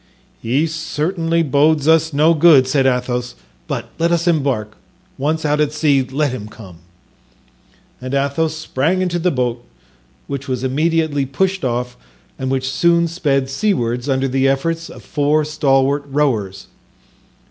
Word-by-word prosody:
"He 130 +7 +1
certainly 165 +1 -1
bodes 150 +1 +2
us 160 0 +4
no 155 +3 +4
good," 150 -5 +5
said 135 0 +2
Athos; 125 -1 -1 0.3
"but - - -5
let 170 +1 +2
us 170 0 +1
embark; 135 -10 0 0.4
once 155 +3 -1
out 150 0 +1
at 150 -1 +1
sea, 145 -3 +2
let 135 +2 -1
him 120 -5 -6
come." 100 -5 -13 1.2
And 130 +2 -4
Athos 140 +3 0
sprang 160 +4 -1
into 175 -1 -1
the 180 +2 +1
boat, 125 -5 -2 0.6
which 140 0 -6
was 130 -1 -3
immediately 150 +1 0
pushed 190 +7 -1
off 125 0 -2 0.4
and 130 - -2
which 130 0 -1
soon 170 +5 +2
sped 145 -6 0
seawards 130 - -1
under 135 0 +1
the 135 +1 +1
efforts 165 +5 -1
of - - -12
four 150 +1 +1
stalwart 140 -2 +1
rowers. 120 -10 -1
140 Hz, 145 wpm, -18 LUFS, 130-160 Hz, 1.2 s, good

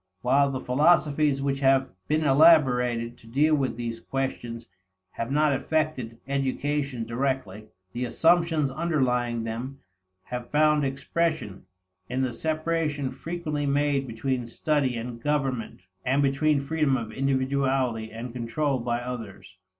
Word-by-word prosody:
While 140 +3 +4
the 130 -1 -3
philosophies 145 0 +2
which 135 -1 0
have 135 -3 +3 0.2
been 155 +1 +1
elaborated 125 -6 +4
to 115 - -17
deal 145 +7 +2
with 135 -5 0
these 115 -1 -4
questions 120 -2 -4 0.5
have 115 +4 -4
not 150 0 +3
affected 135 -5 -1
education 140 -2 -1
directly, 115 -4 -2 0.3
the 125 +1 -2
assumptions 165 0 +2
underlying 125 -7 0
them 120 +5 -5 0.5
have 125 -1 -6
found 150 0 +3
expression 140 - -2 0.4
in 130 +2 -1
the 125 -2 -1
separation 155 -2 -1
frequently 155 -4 -3
made 140 -1 +1
between 120 +1 -2
study 135 0 0
and 115 0 -6
government 135 -8 -1 0.2
and 135 +3 +2
between 140 +1 +2
freedom 145 -2 +1
of 115 -3 -5
individuality 130 -3 0
and 115 +2 -7
control 130 +3 -1
by 120 0 -1
others. 115 -7 -7
135 Hz, 125 wpm, -26 LUFS, 120-150 Hz, 0.5 s, While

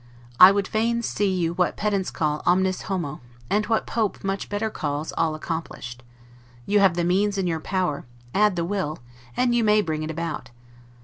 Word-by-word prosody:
I 185 - +11
would 200 -1 0
fain 235 +2 0
see 205 -3 0
you 170 -3 0
what 180 0 0
pedants 200 -3 0
call 150 -1 -1
'omnis 185 +1 +2
homo', 170 -7 -3 0.3
and 210 +1 +1
what 225 -1 +1
Pope 220 -3 -2
much 195 0 -3
better 215 +2 -2
calls 150 -2 -3
ALL 160 -1 +1
ACCOMPLISHED: 155 -7 -6 0.6
you 205 0 +3
have 195 -4 +4
the 175 - 0
means 200 +4 +1
in 190 - 0
your 165 -2 -1
power; 180 -4 -2 0.3
add 210 -1 +3
the 170 -1 -1
will; 175 -5 -2 0.4
and 250 -1 +2
you 240 -1 +2
may 210 0 +4
bring 160 -6 -1
it 155 - -4
about. 160 -6 -4
185 Hz, 185 wpm, -24 LUFS, 160-205 Hz, 0.6 s, I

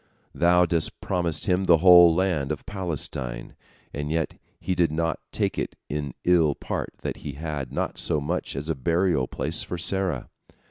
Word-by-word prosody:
Thou 90 +1 +4
didst 85 -2 0
promise 85 -4 -1
him 95 +1 +1
the 85 -2 +6
whole 85 -1 +8
land 85 -6 0
of 75 - -5
Palestine, 75 - -4 0.4
and 75 +1 -4
yet 80 0 -1 0.3
he 95 - -2
did 85 -3 +2
not 80 +1 -1
take - - -1
it - - -3
in 70 -3 -4
ill 80 -5 +3
part - - -4
that - - -3
he 70 - -7
had 75 -3 -5
not - - -3
so 75 - +1
much 80 +3 -3
as 70 +2 -4
a 80 - +1
burial 80 -1 +1
place - - -1
for 90 - -5
Sarah. 90 -5 -1
80 Hz, 175 wpm, -25 LUFS, 75-90 Hz, 0.4 s, whole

